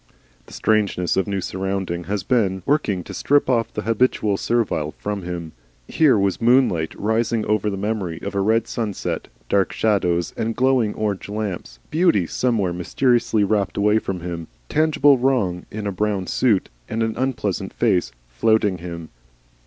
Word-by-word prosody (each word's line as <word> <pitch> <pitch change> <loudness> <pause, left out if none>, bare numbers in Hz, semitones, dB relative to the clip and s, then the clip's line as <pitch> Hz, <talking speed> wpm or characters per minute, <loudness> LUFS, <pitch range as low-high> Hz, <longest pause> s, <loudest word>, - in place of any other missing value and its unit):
The - - -14
strangeness 105 -5 +1
of 95 - +1
new 100 -1 -1
surroundings 95 -2 -3
has 100 -1 -2
been 95 -5 +1
working 110 -11 +1
to - - -9
strip 145 0 +2
off 120 -3 +1
the 105 - -4
habitual 115 -2 +1
servile 95 -9 -1
from 105 -1 -3
him. 85 -2 -5 0.4
Here 150 -8 +4
was 100 -1 0
moonlight 115 -10 +3
rising 110 +1 0
over 105 0 +1
the 100 - -3
memory 95 -5 -2
of 100 - -4
a 100 - 0
red 110 +3 +2
sunset, 110 -4 -3 0.2
dark 100 +4 +2
shadows 90 -6 +1
and 115 0 -2
glowing 130 -4 +2
orange 105 -2 -2
lamps, 100 - -4
beauty 160 - +3
somewhere 105 -3 0
mysteriously 115 +4 +1
rapt 100 -1 0
away 105 +2 +3
from 95 -4 -4
him, 85 -2 -5 0.2
tangible 145 -3 +4
wrong 115 -9 0
in 105 0 -6
a 100 - -1
brown 100 0 -1
suit 110 -4 +1 0.2
and 115 +1 -1
an 110 -1 -1
unpleasant 125 -7 -2
face, 90 -8 +1 0.2
flouting 100 - +1
him. 85 -1 -7
105 Hz, 160 wpm, -22 LUFS, 95-115 Hz, 0.4 s, Here